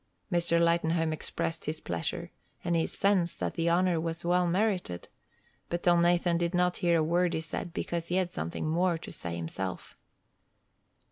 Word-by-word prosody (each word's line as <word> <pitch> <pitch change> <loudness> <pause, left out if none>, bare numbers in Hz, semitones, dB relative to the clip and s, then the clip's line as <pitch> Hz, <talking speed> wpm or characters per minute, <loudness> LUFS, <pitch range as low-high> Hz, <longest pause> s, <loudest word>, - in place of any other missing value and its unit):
Mr. 170 -1 +3
Lightenhome 170 -1 +2
expressed 165 +1 -3
his 155 +1 -2
pleasure, 85 - -3 0.3
and 170 0 +1
his 165 - +1
sense 190 -4 +2
that - - -3
the 165 0 0
honor 175 -1 +2
was 165 +1 -3
well 180 0 +3
merited, 180 - 0 0.6
but 175 0 -2
Elnathan 175 0 +3
did 170 +1 0
not 180 0 +2
hear 170 -1 +3
a 160 - +2
word 175 +2 +2
he 160 - -1
said, 160 +2 -5
because 170 -1 -3
he 175 - -1
had 185 -2 +1
something 80 - -3
more 170 +2 +2
to 160 - -9
say 85 -1 -5
himself. 90 +3 -5
170 Hz, 165 wpm, -30 LUFS, 160-175 Hz, 0.6 s, Mr